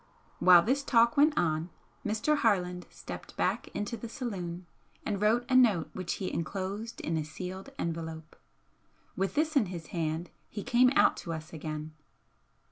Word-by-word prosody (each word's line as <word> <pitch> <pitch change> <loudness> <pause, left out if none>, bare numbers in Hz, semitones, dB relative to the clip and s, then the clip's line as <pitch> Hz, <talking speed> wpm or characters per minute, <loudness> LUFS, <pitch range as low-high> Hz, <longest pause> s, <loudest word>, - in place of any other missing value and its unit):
While 180 -2 +8
this 265 +7 +1
talk 235 -3 +4
went 295 +1 +4
on 160 0 +1 0.3
Mr. 220 +8 +1
Harland 180 -7 +1
stepped - - -9
back - - 0
into 205 +3 -4
the 235 0 -7
saloon 185 - -5 0.4
and 205 -2 -2
wrote 225 +3 +3
a 255 - +1
note 205 -12 +4
which 185 -2 -3
he 190 - -4
enclosed 195 +6 -4
in 165 0 -1
a 155 - 0
sealed 185 - -7
envelope. 160 -1 -4 0.8
With 190 0 -1
this 310 +1 +1
in 230 -8 +4
his 170 -3 -7
hand 165 0 -2 0.2
he 205 - -5
came 250 +1 +5
out - - +5
to 165 - -5
us 160 +1 -7
again. 155 0 -5
185 Hz, 160 wpm, -30 LUFS, 165-230 Hz, 0.8 s, While